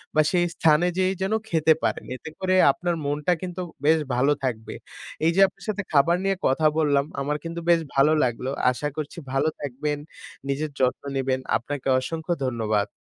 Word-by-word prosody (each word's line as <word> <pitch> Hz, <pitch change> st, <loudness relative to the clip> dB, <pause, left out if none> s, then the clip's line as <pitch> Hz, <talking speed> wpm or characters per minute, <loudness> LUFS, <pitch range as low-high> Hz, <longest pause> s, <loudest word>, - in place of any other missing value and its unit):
বা 155 Hz, -, +6 dB
সেই 175 Hz, -1 st, +2 dB
স্থানে 160 Hz, +2 st, +4 dB
যেয়েই 190 Hz, +1 st, +1 dB
যেন 195 Hz, +3 st, 0 dB, 0.2 s
খেতে 160 Hz, -1 st, +4 dB
পারেন। -, -, -1 dB
এতে 130 Hz, -, -9 dB
করে 185 Hz, 0 st, +1 dB, 0.2 s
আপনার 175 Hz, +3 st, -2 dB
মনটা 145 Hz, +5 st, +1 dB
কিন্তু 180 Hz, 0 st, -5 dB, 0.2 s
বেশ 160 Hz, +1 st, +5 dB, 0.2 s
ভালো 140 Hz, +4 st, +3 dB
থাকবে। 110 Hz, -4 st, -3 dB, 0.5 s
এই 165 Hz, -, +4 dB
যে -, -, +2 dB
আপনার 195 Hz, +1 st, -16 dB
সাথে 210 Hz, -1 st, -2 dB
খাবার 155 Hz, +4 st, +4 dB
নিয়ে 195 Hz, 0 st, +1 dB
কথা 145 Hz, +4 st, +1 dB
বললাম, 145 Hz, -3 st, +2 dB, 0.2 s
আমার 150 Hz, +2 st, -1 dB
কিন্তু 170 Hz, 0 st, -5 dB
বেশ 170 Hz, -1 st, +6 dB, 0.2 s
ভালো 140 Hz, +3 st, +5 dB
লাগলো। 125 Hz, +1 st, -1 dB, 0.2 s
আশা 145 Hz, +4 st, -3 dB
করছি 155 Hz, +2 st, -5 dB, 0.2 s
ভালো 135 Hz, +3 st, +2 dB
থাকবেন। 145 Hz, +2 st, -3 dB, 0.5 s
নিজের 145 Hz, +2 st, -2 dB
যত্ন 130 Hz, +1 st, +1 dB
নিবেন। 130 Hz, -1 st, 0 dB, 0.2 s
আপনাকে 135 Hz, +3 st, -6 dB
অসংখ্য 165 Hz, +5 st, -3 dB
ধন্যবাদ। 110 Hz, -4 st, 0 dB
150 Hz, 175 wpm, -24 LUFS, 135-170 Hz, 0.5 s, বা